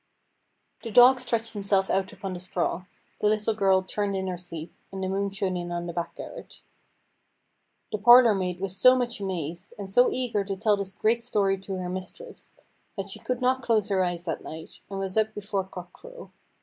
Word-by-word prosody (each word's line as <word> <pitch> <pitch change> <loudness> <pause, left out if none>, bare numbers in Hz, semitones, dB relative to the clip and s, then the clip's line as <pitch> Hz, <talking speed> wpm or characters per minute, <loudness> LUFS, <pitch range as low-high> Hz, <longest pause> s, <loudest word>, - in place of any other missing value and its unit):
The 230 - -6
dog 250 +4 +7
stretched 230 -2 -1
himself 195 -2 +1
out 190 0 0
upon 195 -2 -6
the 180 - -6
straw, 180 0 -2 0.3
the 210 - +3
little 215 +1 +1
girl 195 -3 +3
turned 200 +1 -2
in 190 - -2
her 185 -1 -2
sleep, 170 -2 -8 0.2
and 190 -1 -5
the - - -1
moon 200 +1 -1
shone 195 -2 -2
in 175 -1 -4
on 175 0 -3
the 170 - -5
back 170 0 -4
garret. - - -10 1.3
The 215 - -2
parlour 240 +1 +8
maid 180 -2 -2
was 190 -1 -4
so 255 +5 +7
much 245 -2 -2
amazed, 175 -4 -4
and 200 -2 -6
so 245 +6 +4
eager 240 -5 -1
to 195 0 -4
tell 210 +2 +2
this 195 -1 -5
great 230 +3 +1
story 195 -3 +1
to 190 0 -5
her 185 -1 -4
mistress, 185 - -7 0.4
that 195 0 -3
she - - -4
could 250 -1 -3
not 260 +1 +2
close 220 -4 +1
her 190 -2 +2
eyes 175 -1 -3
that 165 - -3
night, 160 +1 -9
and 195 - -5
was 195 +1 -3
up 220 0 +1
before 200 -2 -2
cock 180 -1 -10
crow. - - -12
195 Hz, 205 wpm, -26 LUFS, 185-220 Hz, 1.3 s, parlour